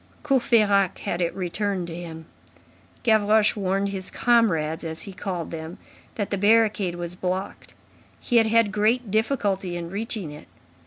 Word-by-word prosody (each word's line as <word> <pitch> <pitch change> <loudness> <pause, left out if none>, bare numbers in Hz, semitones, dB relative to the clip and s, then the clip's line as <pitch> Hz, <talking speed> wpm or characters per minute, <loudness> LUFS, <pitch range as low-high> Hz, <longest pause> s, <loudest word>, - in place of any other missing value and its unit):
Courfeyrac 215 - +3
had 175 - -2
it 170 - +1
returned 190 0 -2
to 165 -1 -7
him. 165 -2 -8 0.8
Gavroche 215 -1 +4
warned 195 0 0
"his 190 -2 -3
comrades" 180 -10 +2
as 160 -1 -5
he 200 - -8
called 180 -3 -4
them, 160 +1 -7 0.4
that 205 -3 -3
the 200 - -1
barricade 210 -3 +3
was 175 0 -5
blocked. 185 +2 -4 0.4
He 240 - +1
had 225 -1 +5
had 225 -2 +3
great 215 +2 +1
difficulty 200 -6 0
in 170 0 -6
reaching 205 -5 -4
it. 150 - -12
195 Hz, 150 wpm, -24 LUFS, 175-220 Hz, 0.8 s, had